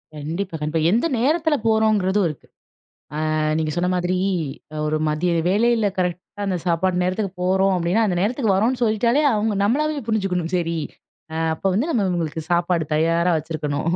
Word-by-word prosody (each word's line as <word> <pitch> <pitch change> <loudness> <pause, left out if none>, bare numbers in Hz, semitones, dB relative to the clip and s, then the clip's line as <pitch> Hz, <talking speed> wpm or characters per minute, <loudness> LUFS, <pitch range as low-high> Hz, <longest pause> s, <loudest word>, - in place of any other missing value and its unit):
கண்டிப்பா, 165 +5 -4
கண்டிப்பா. 155 +2 -1
எந்த 235 - +2
நேரத்தில 310 +4 +2
போறோம்ங்கிறதும் 210 -3 +2
இருக்கு. 150 - -10 0.9
அ - - 0 0.2
நீங்க 155 -1 -1
சொன்ன 175 +1 +1
மாதிரி, 180 +1 0 0.7
ஒரு 155 0 0
மதிய 160 +4 0 0.2
வேளையில 220 +2 +2
கரெக்ட்டா 180 +3 -3
அந்த 185 -2 -1
சாப்பாடு 180 +1 +1
நேரத்துக்கு 185 +2 -1
போறோம் 190 +1 +2
அப்படீன்னா 180 +6 +1
அந்த 185 -3 0
நேரத்துக்கு 220 +1 +1
வரோம்ன்னு 240 +6 +1
சொல்லிட்டாலே 235 +6 +2
அவுங்க 210 0 0
நம்மளாவே 295 +7 +1
புரிஞ்சுக்கணும், 185 -6 -1
"சரி, 170 -1 -1 0.5
அ - - -5 0.2
அப்ப 160 - -19
வந்து 255 - 0
நம்ம 220 -10 +1
இவங்களுக்கு 165 -3 -2
சாப்பாடு 170 -1 +1
தயாரா 165 +3 +2
வச்சிருக்கணும்." 155 0 -3
185 Hz, 150 wpm, -22 LUFS, 170-220 Hz, 0.9 s, எந்த